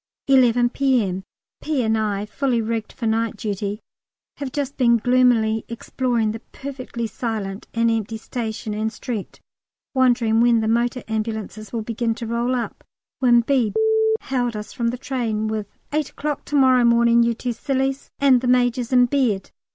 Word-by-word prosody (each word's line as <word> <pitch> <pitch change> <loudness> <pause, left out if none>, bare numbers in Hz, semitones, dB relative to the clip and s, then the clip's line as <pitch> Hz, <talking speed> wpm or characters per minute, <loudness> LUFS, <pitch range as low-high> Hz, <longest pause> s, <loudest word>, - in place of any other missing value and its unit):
11 245 -3 +4
P.M. 240 -9 +1 0.4
P. 300 -5 0
and 220 0 +2
I, 210 -2 -1
fully 250 +2 0
rigged 225 -1 -2
for 235 - -6
night 225 0 0
duty, 205 0 -3 0.6
have 280 -2 -5
just 285 0 -3
been 235 -2 +4
gloomily 230 -2 +3
exploring 235 -1 -1
the 225 - -6
perfectly 255 -2 -6
silent 215 -3 -4
and 230 0 +3
empty 225 0 -2
station 220 -2 -4
and 215 +1 -1
street, 220 -2 -6 0.5
wondering 240 -4 +3
when 235 -1 +4
the 220 - -1
motor 235 +2 0
ambulances 220 -1 -4
would 225 -2 -3
begin 230 0 -1
to 235 0 -6
roll 235 +2 0
up, 240 - -4 0.4
when 240 -2 +5
B 240 -3 +1 0.5
hailed 245 -3 -1
us 210 0 -6
from 235 -4 -1
the 240 +2 -1
train 230 -5 -2
with 215 -2 -3 0.3
"8 305 -1 0
o'clock 295 0 -4
to 295 - -4
morrow 260 -3 +5
morning, 235 0 +5
you 235 0 +2
two 245 +1 -3
sillies, 270 +2 -2
and 265 -3 +4
the 255 - -2
Major's 245 -1 +2
in 250 -1 +6
bed!" 245 -7 0
235 Hz, 165 wpm, -22 LUFS, 220-255 Hz, 0.6 s, in